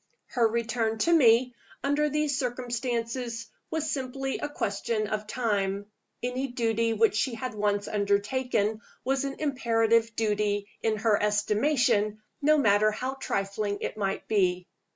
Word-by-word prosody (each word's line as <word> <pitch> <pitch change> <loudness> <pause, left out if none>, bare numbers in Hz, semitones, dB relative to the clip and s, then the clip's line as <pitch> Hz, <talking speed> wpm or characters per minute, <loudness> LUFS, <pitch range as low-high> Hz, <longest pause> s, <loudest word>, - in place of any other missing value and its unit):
Her 235 -3 +3
return 225 0 -1
to 340 - +4
me, 250 -4 +5 0.3
under 290 +2 +2
these 300 -1 0
circumstances, 240 -2 -2 0.2
was 315 -2 -1
simply 270 0 -3
a 295 - -3
question 215 -3 -1
of 210 0 -3
time: 205 -3 -1 0.3
any 250 +2 -1
duty 230 -2 0
which 225 -1 +3
she 235 +2 0
had 255 +2 -4
once 205 -1 0
undertaken 210 +2 0 0.2
was 270 +1 +1
an 275 0 -3
imperative 230 -5 +2
duty 210 -2 0
in 220 -1 +1
her 215 -1 +2
estimation, 210 0 +2 0.2
no 305 +2 +5
matter 215 -5 +4
how 255 +5 -3
trifling 205 -5 -2
it - - -3
might 195 -2 -2
be. 185 -4 +1
230 Hz, 135 wpm, -28 LUFS, 210-260 Hz, 0.3 s, me